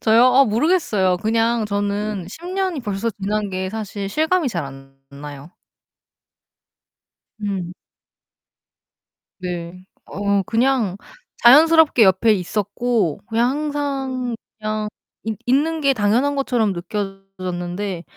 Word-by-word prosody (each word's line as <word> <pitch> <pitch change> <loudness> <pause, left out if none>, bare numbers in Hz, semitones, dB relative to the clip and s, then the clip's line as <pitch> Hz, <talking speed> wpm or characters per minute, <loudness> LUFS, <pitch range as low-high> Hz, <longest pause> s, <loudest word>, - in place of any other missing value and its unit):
저요? 225 +2 +5
아 255 +2 +6
모르겠어요. 220 - +2
그냥 225 +2 +1
저는 205 -1 -2
10 330 - -10
년이 370 -4 -1
벌써 210 0 -2
지난 205 +1 -2
게 185 0 -3
사실 205 -2 -5
실감이 315 - +1
잘 170 - -3
안 135 0 -12 0.2
나요. 145 +2 -9 1.9
음. 190 -4 -3 1.7
네. 180 0 -6 0.2
어 200 0 0
그냥 230 -3 +1 0.5
자연스럽게 305 +1 +7
옆에 195 +3 +4
있었고 205 0 -1
그냥 230 +2 +2
항상 275 -4 -2 0.2
그냥 215 0 -2 0.4
있 220 -1 -3
있는 310 +6 +1
게 275 -1 +3
당연한 240 +6 +1
것처럼 245 -7 +1
느껴졌는데 190 -1 -5
215 Hz, 210 characters per minute, -21 LUFS, 190-255 Hz, 1.9 s, 자연스럽게